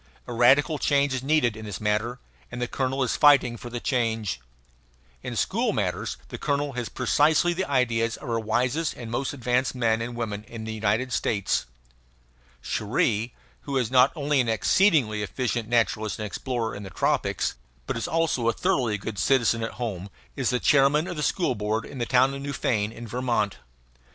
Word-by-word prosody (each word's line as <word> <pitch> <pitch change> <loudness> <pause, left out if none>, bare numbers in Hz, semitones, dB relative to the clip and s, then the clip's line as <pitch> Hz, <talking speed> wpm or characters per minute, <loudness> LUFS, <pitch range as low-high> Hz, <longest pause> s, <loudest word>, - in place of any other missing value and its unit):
A 120 - -6
radical 140 +6 +4
change 140 -1 +2
is 130 - -2
needed 135 -5 +2
in 110 0 -8
this 105 -4 -5
matter; 110 +3 -1 0.3
and 125 - -6
the 125 - -1
colonel 135 +1 -1
is 125 - 0
fighting 140 -5 +5
for 120 +1 -8
the 120 0 -4
change. 115 - -1 0.8
In - - -5
school - - 0
matters - - -2
the - - -7
colonel 145 0 -1
has 125 -2 -4
precisely 150 +7 +2
the 190 -1 -3
ideas 115 -4 +1
of - - -10
our 115 -1 0
wisest 125 +8 0
and 115 -2 -8
most 130 +3 -1
advanced 125 -1 0
men 115 -2 +1
and 120 +1 -4
women 105 -3 -4
in 115 0 -8
the 110 0 -4
United 110 +4 0
States. 100 - 0 1.0
Cherrie 110 +1 0 0.3
who 140 -2 -3
is 125 -3 0
not 130 +1 +6
only 145 -2 +1
an 120 - -1
exceedingly 115 - +3
efficient 115 +2 -2
naturalist 110 -2 +1
and 110 - -4
explorer 115 +1 -3
in 100 - -7
the 95 - -8
tropics, - - 0 0.3
but - - -3
is 115 - -3
also 160 -8 +1
a - - +1
thoroughly 125 - 0
good 100 0 -6
citizen 115 +1 +2
at 115 - -3
home 100 -4 -5 0.3
is - - 0
the 125 - +1
chairman 145 +4 +4
of 180 - -4
the 150 - -4
school 170 -1 +1
board 105 +1 -2
of 135 - -9
the 120 - -1
town 130 +1 +4
of 140 - -6
Newfane, 115 -7 -1
in 120 +1 -9
Vermont. 115 -4 -1
120 Hz, 185 wpm, -25 LUFS, 110-135 Hz, 1.0 s, not